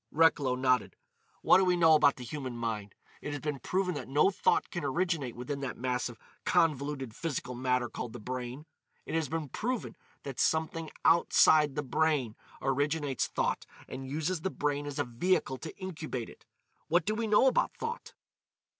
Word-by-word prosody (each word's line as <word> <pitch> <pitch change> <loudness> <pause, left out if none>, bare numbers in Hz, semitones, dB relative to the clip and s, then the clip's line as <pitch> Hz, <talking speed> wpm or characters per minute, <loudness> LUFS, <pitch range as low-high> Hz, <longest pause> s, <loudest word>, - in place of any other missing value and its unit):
Recklow 150 -5 +3
nodded. 130 -1 +1 0.5
"What - - +7
do - - +4
we 180 -1 +3
know 165 -2 +6
about 145 -2 +5
the 125 - -9
human 130 -1 -5
mind? 110 -4 -4 0.3
It 145 - -4
has 145 - -3
been 150 -1 -3
proven 180 +7 0
that 135 -6 -5
no 145 +8 +4
thought - - +1
can 175 - -4
originate 145 -3 -1
within 125 +4 -4
that 135 -2 -4
mass 125 0 -1
of 120 - -11 0.3
convoluted 145 -7 +1
physical 135 -6 -3
matter 125 0 0
called 115 +1 -6
the 120 - -7
brain. 125 +4 -5 0.4
It - - -6
has 160 -4 0
been 160 -1 -2
proven 245 - -3 0.3
that 135 -3 -6
something 160 0 0 0.2
outside 155 -3 +5
the 150 - -1
brain 140 -5 +1 0.3
originates 145 0 0
thought - - -1 0.2
and 130 0 -7
uses 160 +4 -1
the 190 - -1
brain 145 -3 -2
as 145 - -5
a - - +2
vehicle 130 +2 0
to 160 - -8
incubate 155 - -5
it. - - -18 0.4
What 165 +1 +2
do 215 - +1
we 225 +1 -1
know 210 +4 +5
about 265 - +2
thought?" 465 +2 -5
145 Hz, 180 wpm, -30 LUFS, 125-165 Hz, 0.5 s, What